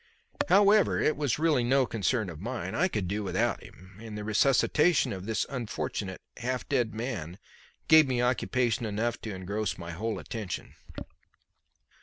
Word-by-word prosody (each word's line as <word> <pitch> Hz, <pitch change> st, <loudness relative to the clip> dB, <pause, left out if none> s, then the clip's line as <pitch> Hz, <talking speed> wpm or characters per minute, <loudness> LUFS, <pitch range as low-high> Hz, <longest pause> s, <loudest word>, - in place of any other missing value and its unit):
However, 205 Hz, 0 st, +5 dB
it 155 Hz, -, +2 dB
was 145 Hz, -6 st, 0 dB
really 150 Hz, -5 st, +2 dB
no 130 Hz, +2 st, +3 dB
concern 110 Hz, -2 st, -1 dB
of 80 Hz, -, -10 dB
mine. 105 Hz, -5 st, -4 dB
I 180 Hz, +5 st, +2 dB
could 105 Hz, -, -2 dB
do 105 Hz, +3 st, -2 dB
without 100 Hz, -, 0 dB
him, 95 Hz, +2 st, -15 dB
and 110 Hz, -2 st, -7 dB
the 105 Hz, -, -5 dB
resuscitation 135 Hz, -, +3 dB
of 95 Hz, +1 st, -7 dB
this 110 Hz, -, 0 dB
unfortunate 105 Hz, -6 st, -4 dB, 0.2 s
half 125 Hz, 0 st, -3 dB
dead 125 Hz, -5 st, +1 dB
man 110 Hz, -, -4 dB, 0.5 s
gave 160 Hz, -2 st, +7 dB
me 125 Hz, -2 st, 0 dB
occupation 125 Hz, -2 st, +1 dB
enough 110 Hz, +3 st, -2 dB
to 110 Hz, -3 st, -5 dB
engross 100 Hz, +3 st, -3 dB
my 85 Hz, -1 st, -7 dB
whole 110 Hz, +6 st, -3 dB
attention. 110 Hz, -5 st, -6 dB
115 Hz, 155 wpm, -29 LUFS, 100-130 Hz, 0.5 s, gave